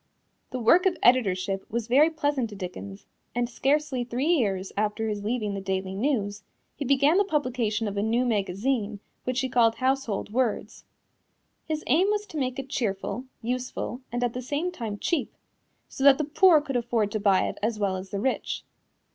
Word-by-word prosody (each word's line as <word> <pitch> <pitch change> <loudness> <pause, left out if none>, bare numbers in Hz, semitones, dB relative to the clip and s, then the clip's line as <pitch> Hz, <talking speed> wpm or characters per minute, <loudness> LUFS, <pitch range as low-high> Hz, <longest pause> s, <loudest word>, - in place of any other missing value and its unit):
The 255 - -4
work 340 - +5
of 360 -2 0
editorship 195 -6 +3
was 235 0 -2
very 275 +7 +5
pleasant 290 -7 -1
to 205 - -9
Dickens, 100 - -7 0.3
and 240 0 +1
scarcely 270 +1 0
three 245 +3 -2
years 195 - 0
after 215 +2 -1
his 205 -1 -3
leaving 215 -2 -1
the 195 - -4
Daily 190 0 -2
News 205 -3 -1 0.3
he 285 - -4
began 280 +6 +4
the - - +5
publication 245 - -1
of 200 - -4
a 200 - 0
new 230 +4 +1
magazine 210 +1 -1 0.3
which 255 0 0
he 260 - 0
called 235 -3 +3
Household 260 -6 -1
Words. 245 -3 -1 0.8
His 310 -1 -2
aim 335 +9 +3
was 420 0 0
to 345 -6 -8
make 255 -2 -1
it 270 0 -5
cheerful, 230 0 -2 0.2
useful 250 0 -3
and 245 +1 -1
at 240 -1 0
the 250 - -4
same 290 +8 -2
time 225 -11 -5
cheap, 330 - -1 0.5
so 270 - -5
that 275 -1 +8
the 305 - 0
poor 315 +2 +5
could 275 -3 -5
afford 230 -3 0
to 215 - -1
buy 200 -2 +3
it - - -6
as 220 +1 0
well 200 -2 0
as 185 +1 -6
the 200 - -3
rich. 260 +5 -2
240 Hz, 190 wpm, -26 LUFS, 205-275 Hz, 0.8 s, that